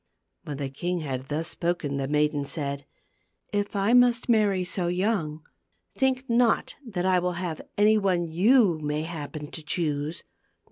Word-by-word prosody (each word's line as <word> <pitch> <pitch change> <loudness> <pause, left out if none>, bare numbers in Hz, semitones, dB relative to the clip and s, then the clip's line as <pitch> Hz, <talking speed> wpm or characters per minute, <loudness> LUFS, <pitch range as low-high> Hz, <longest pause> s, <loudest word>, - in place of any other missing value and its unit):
When 145 -2 -5
the 135 -2 -4
king 175 +5 -2
had 130 -3 -4
thus 155 +3 -1
spoken 170 -5 -1
the 135 -1 -2
maiden 150 0 +1
said, 140 -1 -3 0.3
" - - -45 0.3
If 205 0 -1
I 200 +4 +2
must 245 -1 +4
marry 205 -5 +3
so 180 0 -1
young, 175 -5 -1 0.5
think 265 -1 0
not 235 0 +2
that 195 -8 -3
I 185 -1 +4
will 180 0 -1
have 170 -2 -4 0.2
any 215 +1 +5
one 185 -4 +1
you 190 +1 +4
may 150 0 -2
happen 155 -2 -6
to 160 - -5
choose. 150 -1 -2
175 Hz, 160 wpm, -26 LUFS, 150-205 Hz, 0.5 s, any